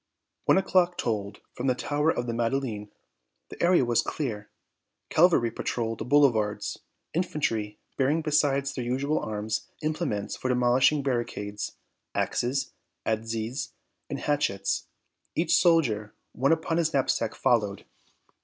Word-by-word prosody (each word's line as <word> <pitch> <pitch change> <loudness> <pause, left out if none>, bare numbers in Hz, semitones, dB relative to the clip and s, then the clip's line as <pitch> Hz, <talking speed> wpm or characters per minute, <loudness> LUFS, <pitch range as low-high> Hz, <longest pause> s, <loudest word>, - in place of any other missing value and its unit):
One - - +5
o'clock 180 -2 +3
tolled 100 -3 -2
from 125 - -3
the 130 - +3
tower 150 +4 0
of 120 -6 0
the 120 - -2
Madeleine. 115 -3 -1 0.6
The - - -9
area 175 -6 +4
was 120 -1 +3
clear. 110 -9 -4 0.6
Cavalry 160 -9 +4
patrolled 115 0 -2
the - - -4
boulevards. 120 -7 +2 0.3
Infantry, 115 - -1 0.2
bearing, 145 +4 +2
besides 140 -2 +2
their 130 - -3
usual 135 +5 0
arms, 110 0 -3 0.2
implements 155 - -2
for 130 - -3
demolishing 125 +3 +3
barricades 110 -6 -2 0.4
axes, 130 +1 0 0.3
adzes 115 +4 -2 0.4
and - - -3
hatchets 100 -10 0 0.5
each 165 - +1
soldier 125 - +3 0.2
one 135 +6 +1
upon 165 0 +1
his 160 -3 +1
knapsack, 115 -4 +1
followed. 105 -5 +1
125 Hz, 125 wpm, -27 LUFS, 110-150 Hz, 0.6 s, One